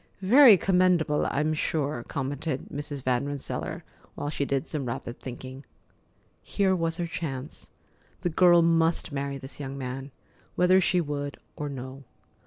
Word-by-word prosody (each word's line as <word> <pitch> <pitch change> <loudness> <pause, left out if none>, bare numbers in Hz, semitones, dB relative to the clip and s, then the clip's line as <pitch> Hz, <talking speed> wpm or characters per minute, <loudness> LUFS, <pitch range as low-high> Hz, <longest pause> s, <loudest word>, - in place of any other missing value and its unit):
"Very 235 +1 +8
commendable, 180 -5 +2
I'm 155 +2 0
sure," 145 -5 -1
commented 140 +1 -3
Mrs. 145 -1 -5
Van 130 +1 +1
Rensselaer, 145 -1 -4 0.3
while 145 - -3
she 140 - -1
did 140 +2 -1
some 145 -5 -3
rapid 120 +1 -5
thinking. 130 +2 -8 0.8
Here 190 -2 +1
was 165 -1 -1
her 175 - -1
chance. 150 -4 -6 0.5
The 175 - 0
girl 175 0 +6
must 165 -1 +2
marry 140 0 -3
this 135 +2 -10
young 135 -1 -5
man, 130 +1 -5 0.5
whether 185 +2 +5
she 180 0 +2
would 145 -2 -4 0.2
or 145 -1 -4
no. 130 0 -7
145 Hz, 145 wpm, -27 LUFS, 135-170 Hz, 0.8 s, Very